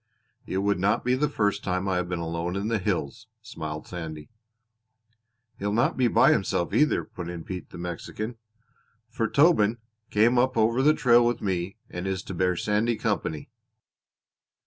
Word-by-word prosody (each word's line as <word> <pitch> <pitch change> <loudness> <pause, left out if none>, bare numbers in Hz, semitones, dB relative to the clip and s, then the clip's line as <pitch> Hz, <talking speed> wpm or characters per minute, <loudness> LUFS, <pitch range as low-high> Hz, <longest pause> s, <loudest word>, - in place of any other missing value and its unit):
"It 95 - -2
would 100 0 +1
not 105 +6 +1
be 125 - +3
the 145 +3 +1
first 105 -6 0
time 90 +1 -1
I 95 -1 +1
have 90 -1 -2
been 90 - -2
alone 85 +2 -3
in 100 +3 -2
the 115 -2 +1
hills," 90 -2 -3 0.2
smiled 80 -8 -6
Sandy. 80 -2 -7 1.3
"He'll 100 +1 -1
not 120 +4 +2
be 125 -2 +3
by - - +5
himself 85 - 0
either," 150 0 +3
put 85 -1 -7
in 85 -2 -6
Pete, 90 +1 -7
the - - -10
Mexican, 90 +7 -5 0.7
"for 115 -1 -1
Tobin 120 -6 +4 0.3
came 115 +4 +4
up 130 0 +1
over 115 +3 +3
the 155 +3 +5
trail 120 -1 +5
with 120 0 +1
me 95 0 -2
and 90 +2 -5
is 95 -1 -2
to - - -7
bear 90 +1 +1
Sandy 105 +5 +1
company." 105 -9 -2
100 Hz, 170 wpm, -26 LUFS, 90-115 Hz, 1.3 s, by